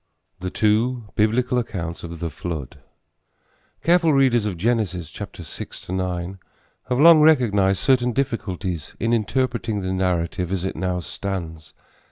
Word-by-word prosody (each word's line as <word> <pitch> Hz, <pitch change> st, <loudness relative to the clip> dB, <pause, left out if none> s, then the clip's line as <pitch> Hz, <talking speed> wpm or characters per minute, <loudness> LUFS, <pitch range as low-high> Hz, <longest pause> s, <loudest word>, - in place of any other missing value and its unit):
THE 90 Hz, 0 st, -3 dB
TWO 110 Hz, +3 st, +1 dB
BIBLICAL 120 Hz, +4 st, +2 dB
ACCOUNTS 85 Hz, -8 st, -5 dB
OF 85 Hz, -1 st, -7 dB
THE 85 Hz, -2 st, -2 dB
FLOOD. 80 Hz, -4 st, -6 dB, 1.0 s
Careful 170 Hz, -1 st, +4 dB
readers 130 Hz, -6 st, +3 dB
of 95 Hz, -4 st, -3 dB
Genesis 95 Hz, -5 st, -1 dB
6 -, -, -8 dB
9 90 Hz, 0 st, -3 dB, 0.5 s
have 125 Hz, 0 st, +1 dB
long 165 Hz, 0 st, +8 dB
recognized 105 Hz, -11 st, +4 dB
certain 125 Hz, -2 st, +3 dB
difficulties 95 Hz, -, -3 dB
in 115 Hz, +2 st, +1 dB
interpreting 115 Hz, -1 st, 0 dB
the 95 Hz, 0 st, -2 dB
narrative 90 Hz, -1 st, -1 dB
as 95 Hz, -1 st, -1 dB
it 95 Hz, -, -3 dB
now 90 Hz, -1 st, -1 dB
stands. 85 Hz, -4 st, -6 dB
100 Hz, 130 wpm, -23 LUFS, 90-120 Hz, 1.0 s, long